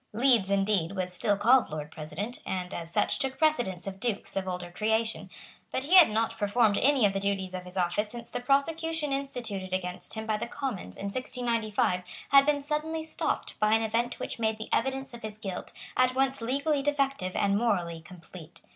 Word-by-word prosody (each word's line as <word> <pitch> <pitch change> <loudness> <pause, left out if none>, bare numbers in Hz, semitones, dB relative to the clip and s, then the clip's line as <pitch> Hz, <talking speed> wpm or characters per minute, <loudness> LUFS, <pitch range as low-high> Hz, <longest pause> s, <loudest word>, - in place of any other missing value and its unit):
Leeds, 235 -4 +3
indeed, 195 -3 +1
was 185 -2 -3
still 205 +2 +1
called 240 +5 +5
Lord 150 -1 -5
President, 160 +11 -6
and, 180 0 -4
as 165 -1 -5
such, - - +1
took 265 -1 -1
precedence 245 - +1
of 195 -1 -6
dukes 220 -2 -2
of 190 -1 -2
older 180 -1 -4
creation; 220 +4 0 0.4
but 260 - -1
he 305 +6 -1
had 360 -7 +9
not 225 +1 -1
performed 205 0 +3
any 270 -4 +4
of 200 - +3
the 195 - -1
duties 195 -2 -1
of 180 0 -5
his 180 +1 -8
office 185 +4 +1
since 235 +1 -7
the - - -4
prosecution 300 +3 +1
instituted 235 -9 -4
against 180 +2 -2
him 220 0 -4
by 215 -1 0
the 215 - -4
Commons 235 - -4
in - - -6
1695 230 -6 0 0.3
had 275 0 +7
been 290 -1 +2
suddenly 310 +2 -2
stopped 320 - -2
by 215 +1 +4
an 225 - +1
event 230 +2 -1
which - - -5
made 220 -1 0
the 220 - -7
evidence 265 +1 -1
of 235 - -9
his 215 -1 -6
guilt 195 -4 -5 0.2
at 255 0 +3
once 270 -1 +1
legally 280 +5 0
defective 275 -9 0
and 200 0 +2
morally 180 -7 0
complete. 170 0 -13
220 Hz, 195 wpm, -29 LUFS, 190-265 Hz, 0.4 s, had